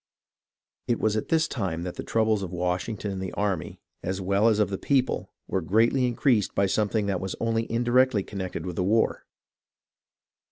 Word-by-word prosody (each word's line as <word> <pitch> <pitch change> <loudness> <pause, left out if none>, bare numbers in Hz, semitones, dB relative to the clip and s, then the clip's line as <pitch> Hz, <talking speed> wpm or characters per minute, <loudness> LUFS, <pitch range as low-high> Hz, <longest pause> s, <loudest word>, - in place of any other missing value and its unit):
It 120 - +1
was 110 -1 +1
at 110 - -2
this 160 0 +2
time 90 -9 -3
that 90 -1 -4
the - - -6
troubles 110 -2 +1
of 95 -3 -5
Washington 90 +4 -2
and 95 -1 -4
the 95 - -4
army, 100 -5 -2 0.2
as 95 +2 -3
well 100 +3 +2
as 110 -2 +4
of 105 -2 +1
the 95 - -3
people, 135 -3 0 0.2
were 95 - -1
greatly 115 +8 +3
increased 120 -3 +1
by 100 - +3
something 105 +2 +1
that 95 -3 -1
was 95 -1 -3
only 115 0 -1
indirectly 120 -1 +3
connected 95 -3 -5
with 90 -2 -5
the 90 - +1
war. 110 +5 +1
105 Hz, 185 wpm, -26 LUFS, 95-115 Hz, 0.2 s, as